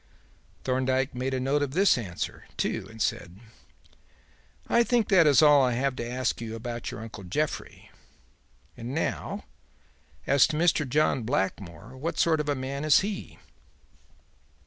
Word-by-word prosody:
Thorndyke 130 +1 0
made 130 +2 -2
a - - -1
note 135 +3 +1
of 140 -2 -2
this 195 +4 +4
answer, 100 -9 -5
too, - - -2
and 110 - -13
said: 90 -3 -2 1.3
"I 235 - +4
think 240 -2 +1
that 185 -6 +6
is 145 +1 +6
all 145 -2 +7
I 125 -2 +2
have 130 +2 0
to 120 - -4
ask 125 -1 -2
you 115 -1 -5
about 120 0 -5
your - - -7
uncle 110 -3 -9
Jeffrey. 145 +12 -4 0.8
And 120 +3 -6
now 165 - -3 0.8
as 140 -1 +5
to 150 - -3
Mr. 160 -4 +2
John 150 -1 +2
Blackmore. 95 - -3
What 160 +5 -4
sort 160 -2 +3
of 145 -2 -1
man 135 +2 -4
is 155 -1 +5
he?" 200 0 -5
130 Hz, 150 wpm, -27 LUFS, 120-150 Hz, 1.3 s, all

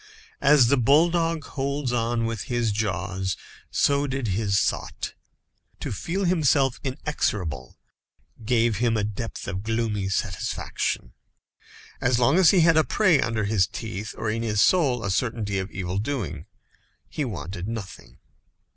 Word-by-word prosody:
As 140 -2 +6
the 140 - +4
bulldog 165 +5 +3
holds 140 -2 -2
on 115 -1 0
with 115 -2 -3
his 120 -3 0
jaws, 95 -2 -2 0.3
so 140 0 +2
did 135 -4 -2
his 100 0 +1
thought. - - -2 0.7
To - - -4
feel 175 - -2
himself 145 -7 +2
inexorable 105 - -3 0.7
gave 115 -1 +2
him 115 0 +1
a 105 - 0
depth 105 +2 -5
of 95 -1 -3
gloomy 110 -3 -1
satisfaction. 90 -9 -2 0.9
As 120 -1 +2
long 135 +8 +4
as 180 -4 +7
he 185 - +5
had 165 -1 +5
a 155 - +6
prey 175 -8 +3
under 115 -1 -1
his 100 -2 +2
teeth, 110 -1 -6
or 110 - -1
in 115 +1 -2
his 105 -3 -1
soul, 135 - +3
a 100 - -1
certainty 105 -2 -1
of 95 +1 -4
evil 95 0 -3
doing, 100 - -3 0.6
he 150 - -3
wanted 95 -6 -5
nothing. 95 - -7
115 Hz, 145 wpm, -25 LUFS, 100-140 Hz, 0.9 s, as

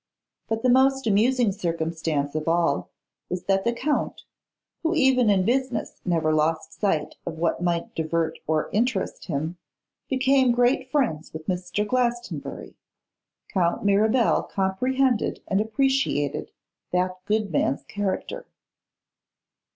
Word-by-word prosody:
But 225 0 -1
the 255 - +4
most 265 +1 +4
amusing 230 +2 +3
circumstance 160 -5 -2
of 155 0 -3
all 165 - +1 0.4
was 180 0 -3
that 195 0 +1
the 235 - +3
Count, 290 +5 -2 0.6
who 335 +1 0
even 260 -6 +4
in 190 -2 +3
business 255 -1 -1
never 165 -3 +1
lost 160 +1 0
sight 155 -7 -1
of 165 -2 -5
what 170 +1 0
might 170 -1 -1
divert 165 0 -1
or 155 0 0
interest 245 +5 -1
him, 160 +2 -3 0.5
became 265 -1 +3
great 250 +2 +2
friends 240 - 0
with 155 0 -7
Mr. 185 +4 -2
Glastonbury. 240 0 -2 0.8
Count 175 0 0
Mirabel 215 +4 +3
comprehended 245 +6 0
and 195 +1 +2
appreciated 220 - 0 0.4
that 185 +1 0
good 210 -2 0
man's 140 -3 0
character. 205 - -4
200 Hz, 120 wpm, -25 LUFS, 165-250 Hz, 0.8 s, the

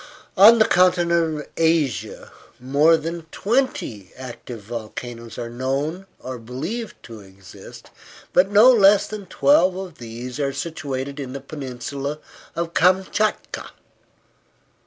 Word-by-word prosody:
On 215 +4 +8
the 220 - +5
continent 170 -3 +2
of - - -12
Asia, 160 -6 0 0.3
more 145 +6 +4
than 165 +1 -6
twenty 205 - -1
active 125 -2 -9
volcanoes 115 +1 -7
are 120 - -4
known 135 +9 -3
or 130 -1 -7
believed 155 - -5
to 115 -2 -10
exist, 95 -1 -14 0.4
but 185 +2 +4
no 215 +5 +7
less 200 -3 +5
than 210 -3 -8
twelve 190 -4 +3
of 185 -3 -8
these 120 +3 -7
are 140 -1 -1
situated 140 -2 -5
in 130 -2 -6
the 140 - -5
peninsula 140 +1 -6 0.4
of 170 0 -3
Kamchatka. 190 +4 +1
150 Hz, 120 wpm, -22 LUFS, 125-185 Hz, 0.4 s, On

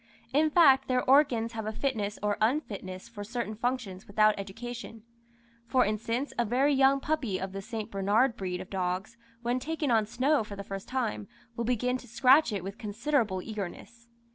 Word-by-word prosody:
In 305 +3 +4
fact, 275 -5 +5
their 255 0 0
organs 255 -5 +4
have 220 -2 -5
a - - -1
fitness 220 -4 -2
or 205 0 +1
unfitness 205 -7 -1
for 205 -3 -8
certain 230 0 -4
functions 225 -4 -3
without 215 +1 +4
education; 225 +3 -7 0.6
for 250 +2 +3
instance, 230 +6 -2
a - - +4
very 260 +6 +2
young 270 0 +4
puppy 270 -10 -1
of 190 0 -4
the 195 0 -5
St. 220 +1 -6
Bernard 210 +6 +2
breed 180 -4 -4
of 185 - -11
dogs, 185 +3 -2 0.3
when 240 +2 0
taken 305 0 -2
on 220 -2 +3
snow 255 +4 +2
for 205 -1 -8
the 200 - -6
first 195 0 -7
time, 240 -5 -2 0.3
will 235 - -2
begin 250 +1 0
to 250 - -14
scratch 255 +4 +5
it 200 -4 -3
with 195 +4 -7
considerable 215 -3 -1
eagerness. 220 +3 -7
230 Hz, 180 wpm, -29 LUFS, 205-255 Hz, 0.6 s, fact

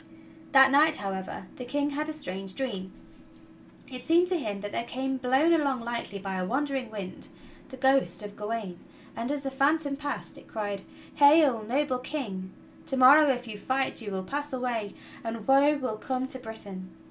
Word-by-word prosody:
That 270 -2 +7
night, 305 +3 +5
however, 190 -3 -4
the 250 - -6
King 285 +3 -1
had 300 +2 -2
a - - -3
strange 195 -10 -6
dream. 195 -9 -3 1.0
It 255 -2 -8
seemed 335 +6 +4
to 360 -2 +1
him 205 -7 -4
that 205 0 -5
there - - -2
came, 265 +2 -3
blown 265 +6 +3
along 280 -6 +1
lightly 235 -3 -4
by 195 -1 -4
a 185 - -1
wandering 270 -1 -1
wind, 200 -4 -7 0.4
the 260 - -9
ghost 265 -4 +2
of 205 0 -8
Gawain, 210 -4 -4 0.4
and 235 +4 -3
as 290 -1 -3
the 270 - -3
phantom 285 +1 +2
passed 290 +1 -5
it - - -18
cried: 205 -3 -4 0.3
"Hail, 285 -5 +6
noble 255 +3 0
King! 210 -10 -5 0.4
To 270 - 0
morrow 280 +4 +8
if 250 -2 -1
you 210 -2 -6
fight 260 +4 0
you 215 - -5
will 190 -1 -3
pass 290 +8 -4
away 245 -5 -2 0.3
and 225 -2 -5
woe 280 +2 +5
will 255 -6 -3
come 255 +3 -2
to 260 -3 -4
Britain. 200 -5 -8
255 Hz, 180 wpm, -28 LUFS, 210-280 Hz, 1.0 s, morrow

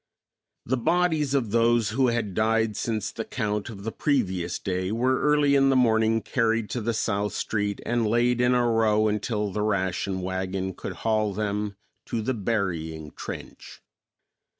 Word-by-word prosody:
The 130 +3 0
bodies 160 0 +1
of 120 -7 0
those 115 -1 +3
who 130 +4 +2
had 115 -5 -1
died 110 +1 +1
since 110 -2 -2
the 115 - -4
count 105 -3 -2
of 100 -4 -9
the 110 - -3
previous 95 - 0
day 95 0 -2
were 125 +4 +1
early 150 -1 +3
in 135 -1 +5
the 135 - +3
morning 110 -2 +3
carried 115 -3 0
to 120 - -2
the 115 +1 -1
south 105 -2 -1
street 105 -2 -1
and 120 -2 +1
laid 120 +2 +2
in 125 0 +3
a 120 -1 +3
row 110 -2 +3
until 105 0 -1
the 105 - -2
ration 95 -2 -1
wagon 95 +1 -2
could - - -6
haul 110 -3 +1
them 105 0 -2 0.3
to 115 -2 -2
the 130 - 0
burying 85 -8 -2
trench. - - -9
110 Hz, 165 wpm, -26 LUFS, 100-120 Hz, 0.3 s, in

